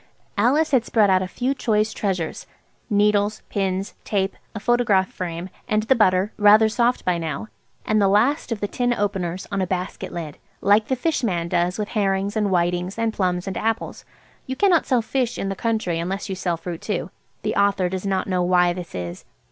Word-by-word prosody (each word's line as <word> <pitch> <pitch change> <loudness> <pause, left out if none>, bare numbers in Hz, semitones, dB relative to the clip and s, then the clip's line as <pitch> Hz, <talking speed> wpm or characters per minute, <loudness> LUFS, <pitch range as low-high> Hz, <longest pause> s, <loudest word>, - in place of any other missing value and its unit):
Alice 275 +9 +2
had 260 -5 +4
spread 215 -4 +3
out 185 0 +4
a 185 - -2
few 250 +8 -1
choice 220 -4 0
treasures–needles, 205 +3 -1
pins, 195 0 -2
tape, 195 -2 -1 0.2
a - - -3
photograph 215 -4 +2
frame, 175 -1 -5 0.2
and 215 0 +1
the 235 - +4
butter, 190 -2 +3
rather 210 +1 +7
soft 240 +3 +1
by 180 -2 +1
now, 165 +7 -4 0.4
and 215 -1 +2
the 200 - +4
last 235 +8 +2
of 225 - -2
the 205 - 0
tin 245 +3 0
openers–on 195 -1 -2
a 185 - 0
basket 185 +1 -4
lid, 160 -4 -6 0.2
like 210 +2 +3
the 260 - +1
fish 300 +2 -1
man 175 -6 0
does 175 +1 0
with 210 -1 -3
herrings 200 -1 0
and 215 -2 +1
whitings 175 +1 0
and 230 -1 0
plums 180 -3 0
and 195 -2 -4
apples 225 0 -2 0.4
(you 260 - -3
cannot 360 0 +3
sell 245 -3 +2
fish 250 +1 -1
in 195 - -2
the 195 - -2
country 215 -6 -1
unless 190 +4 -3
you - - -1
sell 180 -2 -2
fruit 170 0 -6
too. 190 -4 -3 0.3
The - - -1
author 200 -2 +2
does 185 0 -4
not 195 -1 0
know 185 -2 0
why 180 0 +3
this 175 -1 -8
is). 90 0 -5
200 Hz, 195 wpm, -23 LUFS, 180-220 Hz, 0.4 s, rather